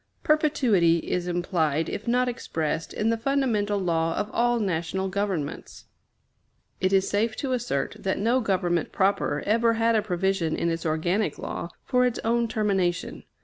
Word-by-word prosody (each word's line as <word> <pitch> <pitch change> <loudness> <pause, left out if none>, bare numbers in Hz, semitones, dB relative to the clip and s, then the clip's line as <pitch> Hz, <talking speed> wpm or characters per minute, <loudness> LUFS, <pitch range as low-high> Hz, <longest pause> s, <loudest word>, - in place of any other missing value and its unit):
Perpetuity 250 - +3
is 180 -1 -1
implied, 165 -3 0
if 220 - -5
not 250 +1 +2
expressed, 165 -9 -3
in 220 +2 0
the 230 - -1
fundamental 230 -6 +1
law 165 -3 0
of 210 +1 -2
all 240 0 +2
national 190 -1 -1
governments. 190 -7 -3 0.9
It 185 +1 +1
is 195 -1 +3
safe 220 +2 0
to 270 - -3
assert 140 - -2
that 190 - -1
no 235 +5 +2
government 180 -5 0
proper 195 +1 +1
ever 230 +2 +3
had 230 0 +2
a 215 - +3
provision 185 -3 0
in 170 - 0
its 165 0 -3
organic 175 +7 0
law 170 - -5 0.2
for 250 -1 +2
its 250 -2 0
own 235 +1 +1
termination. 195 -6 -1
200 Hz, 155 wpm, -26 LUFS, 175-230 Hz, 0.9 s, Perpetuity